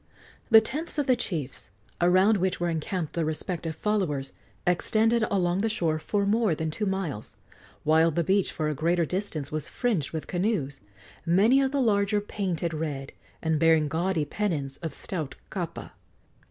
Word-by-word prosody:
The 220 -2 +9
tents 305 +9 -4
of 290 - +1
the 255 - +4
chiefs, 150 - -4 0.3
around 185 +5 +5
which 190 0 0
were 175 0 0
encamped 165 +1 -3
their 170 - 0
respective 160 +1 -3
followers, 160 -9 -1 0.3
extended 220 +6 +2
along 180 -2 +1
the 225 - +1
shore 165 -7 0
for 200 +5 0
more 210 -4 +2
than 160 0 -2
two 210 +6 -2
miles, 185 - -3 0.5
while 160 +2 +4
the 170 +2 0
beach 195 +3 +2
for 155 -2 -2
a 150 - 0
greater 170 +3 +1
distance 170 -5 -3
was 155 -1 -3
fringed 210 - -1
with 160 -1 -4
canoes, 175 -8 -1 0.4
many 205 +11 +4
of 265 -1 +1
the 280 -1 +1
larger 205 -3 +2
painted 185 -5 -2
red 150 -3 -4 0.3
and 160 -1 +1
bearing 160 -1 +4
gaudy 165 +1 0
pennons 145 -7 -2
of 165 -2 -5
stout 160 -7 -5 0.2
kapa. - - -5
175 Hz, 165 wpm, -27 LUFS, 155-205 Hz, 0.5 s, The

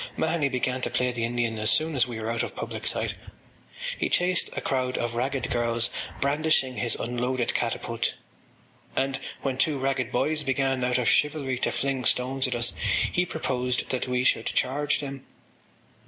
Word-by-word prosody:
Mahony 160 -3 +1
began 130 0 -1
to - - 0
play 125 0 +1
the 120 -2 -1
Indian 115 -2 -1
as 110 +1 +3
soon 155 +3 +3
as 130 -1 +4
we 120 -2 -5
were 110 +1 -2
out 115 0 0
of - - -4
public - - -4
sight. - - +1 0.9
He - - +1
chased 180 0 +3
a - - +2
crowd 130 -1 0
of 120 0 -1
ragged 130 +3 -1
girls, 120 -1 +1 0.3
brandishing 140 -2 +2
his 120 - +2
unloaded 125 +1 -1
catapult - - -1 0.8
and, 135 0 0 0.2
when 130 -1 -1
two 150 -1 +3
ragged 130 -2 -1
boys 155 +6 +1
began, 135 -2 0
out 125 0 +2
of 125 - 0
chivalry, 145 -4 +2
to - - +1
fling 135 -2 -1
stones 130 +3 +2
at 125 - -2
us, 120 0 +1 0.4
he 180 0 +1
proposed 125 -6 -1
that 130 0 -1
we 125 0 +1
should - - +2
charge 145 +3 +1
them. 140 -2 -6
130 Hz, 175 wpm, -27 LUFS, 125-140 Hz, 0.9 s, as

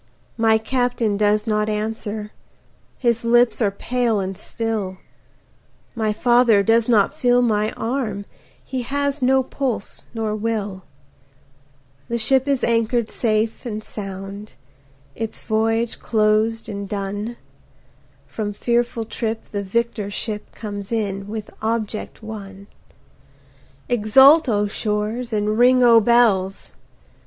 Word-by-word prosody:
My 225 -1 +4
Captain 245 -2 0
does 210 +1 +2
not 210 -1 0
answer, 215 0 -3 0.7
his 235 -2 +1
lips 240 +1 +3
are 210 - +3
pale 235 +2 -1
and 190 0 -3
still, 210 -2 -3 1.0
My 220 -2 0
father 240 -1 +4
does 225 +3 +3
not 210 -4 +4
feel 245 0 +3
my 215 -2 +1
arm, 225 -4 -3 0.4
he 260 -1 -3
has 285 +3 -2
no 265 +1 +3
pulse 255 -5 -4
nor 220 -2 -2
will, 210 -3 -3 1.3
The 235 - -1
ship 265 +4 +2
is 275 -2 +1
anchor'd 230 0 +1
safe 220 -1 0
and 215 -3 -5
sound, 195 0 -7 0.6
its 225 -1 -5
voyage 225 +1 0
closed 220 +1 +1
and 200 -2 -6
done, 205 +3 -4 0.9
From 210 -2 -4
fearful 235 +1 0
trip 225 0 -4
the 205 - -2
victor 215 +1 -2
ship 210 +1 -4
comes 205 -2 -6
in 200 -3 -2
with 215 0 -6
object 220 -1 -3
won; 200 -3 -8 1.2
Exult 265 +7 +6
O 210 -2 +2
shores 215 +3 -2
and 215 +1 0
ring 250 +1 +5
O 230 -1 +7
bells! 210 -5 +2
220 Hz, 120 wpm, -21 LUFS, 210-235 Hz, 1.3 s, O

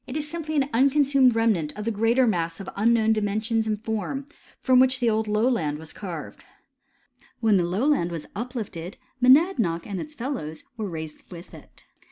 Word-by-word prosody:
is 295 +3 -3
simply 310 0 -4
an 275 -2 +2
iinconsumed 270 -1 +3
remnant 210 -10 +1
of 210 - -5
the 230 - 0
greflter 230 +4 +2
mass 165 -5 -1
of 195 - -8
un 220 +4 +3
known 220 -1 +3
dimensions 215 +1 -1
and 215 0 -3
form, 225 +5 -3 0.3
from 255 -1 +4
which 260 0 +3
the 240 - +1
old 220 -1 +1
lowland 210 - +1
was 160 +1 -10
carved. 175 -7 -7 1.0
When 220 -4 +3
the 180 - +2
lowland 205 - +1
was 165 -3 -6
uplifted, 210 -7 -6 0.2
Monadnock 250 - +4
and 195 -3 -4
its 300 0 -9
fellows 235 - -5
were 215 -4 -4
raised 160 -2 -7
with 175 -1 -11
it. - - -15
220 Hz, 175 wpm, -25 LUFS, 185-255 Hz, 1.0 s, from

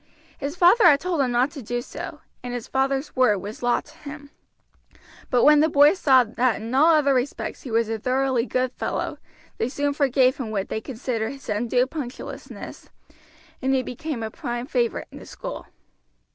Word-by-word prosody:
His 285 +3 -4
father 365 +5 +5
had 290 -5 +7
told 345 -3 -1
him 260 - +1
not 245 +3 +2
to 290 - -8
do 240 +2 -3
so, 240 - -8 0.2
and 245 0 -5
his 240 - -5
father's 270 +2 -1
word 250 -6 +4
was 205 +3 -8
law 245 0 +2
to 300 +2 -19
him; 285 -1 -10 1.0
but 245 -2 +3
when 300 0 +7
the 315 +2 +4
boys 295 +5 +5
saw 260 -3 +6
that 235 +1 0
in 225 +3 -6
all 315 +5 +5
other 285 -2 +3
respects 260 +1 -2
he 260 - -8
was 230 0 +1
a 225 0 -3
thoroughly 255 0 0
good 255 0 0
fellow, - - -3 0.4
they 230 - 0
soon 285 +2 -1
forgave 265 -2 +3
him 250 -5 -4
what 200 -3 -3
they 220 - -3
considered 230 -1 -3
his 275 -3 -12
undue 235 +4 +1
punctiliousness, 260 -3 -8 0.7
and 265 0 +1
he 260 - +1
became 260 -1 -5
a 220 - -4
prime 240 +2 -4
favorite 245 -4 -1
in - - -10
the - - -12
school. - - -7
260 Hz, 190 wpm, -24 LUFS, 240-285 Hz, 1.0 s, had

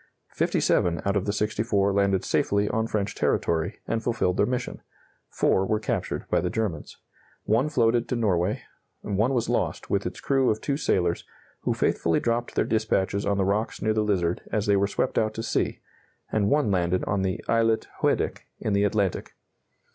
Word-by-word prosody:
Fifty - - +1
seven 85 -1 +2
out 100 0 +1
of 100 - 0
the - - +2
64 105 -1 0
landed 100 -1 +2
safely 100 +1 +1
on 110 +1 0
French 105 -3 -1
territory, 85 +4 0
and 115 0 -1
fulfilled 115 -6 0
their 100 - +3
mission; 125 0 -3 0.5
4 95 - +2
were 105 +2 0
captured 110 -4 -2
by - - +1
the 90 - -1
Germans; 100 -7 -3 0.5
1 120 +8 +2
floated 120 -4 +2
to - - 0
Norway; 100 -4 0 0.4
1 105 +5 0
was 120 -4 0
lost, - - -1
with - - +1
its - - -7
crew 135 -2 +2
of 110 - 0
two 140 - -1
sailors, 90 - 0 0.4
who - - +1
faithfully 85 -1 +1
dropped 120 0 -1
their - - +2
dispatches 100 -3 0
on 100 -1 +1
the 95 - +2
rocks 105 +3 -1
near 110 0 +1
the 110 - +1
Lizard 90 -5 0
as 105 -1 0
they 100 -2 +3
were 100 0 +2
swept - - 0
out 110 0 -1
to 115 - -4
sea; 115 - -1 0.5
and 105 -2 +1
1 145 -7 +2
landed 90 -1 +1
on 100 -1 0
the 95 -1 -1
islet 115 -1 +2
Hoedic, - - 0
in 105 - -1
the 100 +1 +3
Atlantic. 100 -3 -1
105 Hz, 185 wpm, -26 LUFS, 95-115 Hz, 0.5 s, their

